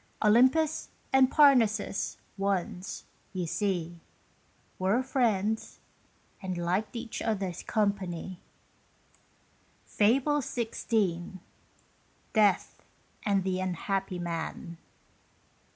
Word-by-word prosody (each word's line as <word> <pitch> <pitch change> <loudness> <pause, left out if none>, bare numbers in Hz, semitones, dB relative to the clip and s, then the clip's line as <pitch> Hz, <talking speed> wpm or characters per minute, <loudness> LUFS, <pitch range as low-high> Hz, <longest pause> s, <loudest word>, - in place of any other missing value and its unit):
Olympus 260 +9 +4 0.2
and 265 -1 +6
Parnassus 230 -10 +3 0.2
once, 195 -2 -2 0.3
you 185 -2 -2
see, 175 -2 -2 0.8
Were 195 +7 +2
friends, 220 -5 0 0.6
and 185 -2 -3
liked 180 +7 -1
each 230 -1 -5
other's 195 -6 -2
company. 190 -4 -2 1.5
FABLE 270 +7 +2
XVI. 215 -8 -1 1.0
DEATH 210 -4 +2 0.5
AND 200 -2 +2
THE 185 0 -1
UNHAPPY 185 +1 -2
MAN. 170 -1 -5
200 Hz, 75 wpm, -29 LUFS, 185-230 Hz, 1.5 s, and